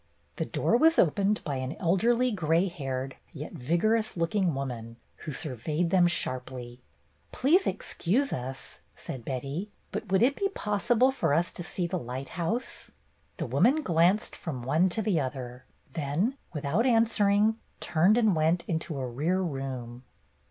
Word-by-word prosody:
The - - -1
door 235 - +2
was 325 +5 +5
opened 200 +5 +2
by 140 -4 -2
an 130 +3 -4
elderly, 230 +8 +2
gray 170 -2 +2
haired, 135 -6 -4 0.2
yet 150 0 -7
vigorous 175 - +1
looking 170 -1 +1
woman, 120 -4 -5 0.2
who 155 - -6
sur 150 -2 -4
veyed 155 +8 -1
them 180 -2 +5
sharply. 125 -6 -3 0.5
''Please 340 +9 +3
excuse 255 +11 0
us," 130 +1 -6 0.2
said 130 -3 -7
Betty, 140 - -4 0.2
"but - - -5
would 195 +3 +4
it 275 +3 +3
be 395 -1 0
possible 220 +5 +2
for 205 - +1
us 170 +2 +1
to - - -8
see 175 +1 -2
the 180 +1 -2
lighthouse? 160 - -4 0.2
" - - -39
The - - -2
woman 300 +5 +3
glanced 180 - +2
from 135 -8 -5
one 160 +9 +3
to 220 +5 -1
the 195 -6 +2
other, 130 -2 -5 0.3
then, 165 - 0 0.2
without 160 - 0
answering, 220 -2 +3 0.2
turned 175 +6 +3
and 220 -6 +4
went 160 +3 +2
into 160 -2 -2
a 130 - -2
rear 150 +10 0
room. 130 -6 -5
170 Hz, 155 wpm, -28 LUFS, 135-210 Hz, 0.5 s, was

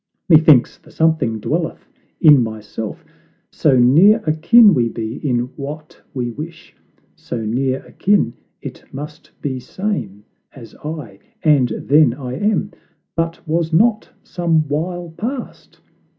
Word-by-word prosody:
Methinks 155 -7 +5
the - - -20
Something 160 -9 0
dwelleth 165 +8 -3 0.3
in 150 -5 +7
myself, 110 -1 -6 0.5
So 135 -4 +2
near 155 - +5
akin 190 +8 +5
we 120 -5 +1
be 115 +1 -5
in 125 -5 -1 0.2
what 150 +2 -8
we 120 -2 -2
wish 160 +6 -10 0.4
So 115 -3 -6
near 130 +4 -1
akin 200 - +1 0.3
it - - -8
must 150 +3 -9
be 130 -3 -3
same 125 - -5 0.3
as 120 -4 -13
I. 145 -11 -7 0.2
And 145 -6 +3
then 145 -4 +3
I 130 -3 -6
am; 205 +8 -1 0.4
but 165 0 -3
was 165 +1 -1
not 215 +6 +2
some 165 -3 0
while 170 +4 -3
past? 245 +6 -7
150 Hz, 125 wpm, -18 LUFS, 125-165 Hz, 0.5 s, in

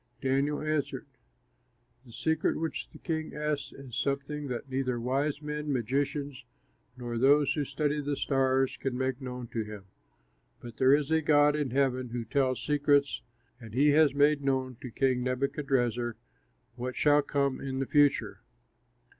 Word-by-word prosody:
Daniel 140 +2 0
answered, 155 -2 -2 1.0
"The - - -13
secret 160 +7 0
which 160 0 -4
the - - -14
king 160 -2 -4
asks 150 -1 -2
is 135 -4 -10
something 140 +1 -2
that 125 +1 -4
neither 130 -2 -1
wise 140 +5 -1
men, 150 0 -3
magicians, 140 +2 -2 0.5
nor 120 -2 -4
those 140 +2 +4
who 150 - -1
study 145 +2 -1
the 145 0 -2
stars 135 -1 +1
can 130 -2 -3
make 130 0 -2
known 125 -1 -6
to 115 - -2
him; 105 -2 -9 0.7
but 120 -2 -10
there 130 +1 +6
is 150 +1 -2
a 160 0 +3
God 150 -1 +4
in 150 -3 -1
heaven 130 -1 0
who 120 0 -4
tells 130 +2 0
secrets, 145 -1 +2 0.4
and 115 -2 -10
he 145 +3 +4
has 145 -1 +4
made 145 0 +4
known 130 -2 0
to 125 - -6
King 130 +1 +1
Nebuchadrezzar 125 -2 -1 0.6
what 125 +1 -4
shall 145 0 +4
come 140 -2 -1
in 135 -1 -4
the 135 - -1
future. 145 0 +2
135 Hz, 155 wpm, -29 LUFS, 125-145 Hz, 1.0 s, there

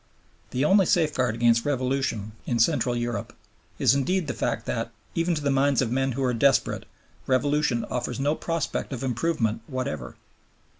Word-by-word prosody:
The 130 +3 0
only 190 +2 +5
safeguard 130 -9 +2
against 115 0 +3
Revolution 130 -6 -1 0.2
in 120 - 0
Central 125 0 +2
Europe 120 0 -3 0.4
is - - +4
indeed 175 +6 +1
the 140 - -3
fact - - -2
that, 115 -1 -2 0.2
even 170 +1 +1
to 150 - -3
the 140 - +2
minds 135 -1 +3
of 120 -4 +1
men 135 +1 +1
who 135 +3 -2
are 125 -1 +1
desperate, 135 +3 +2 0.4
Revolution 135 -1 +1
offers 125 +1 -3
no 145 +2 +2
prospect 165 -3 -3
of 130 0 -5
improvement 120 -3 0
whatever. 75 - -4
130 Hz, 160 wpm, -26 LUFS, 120-145 Hz, 0.4 s, only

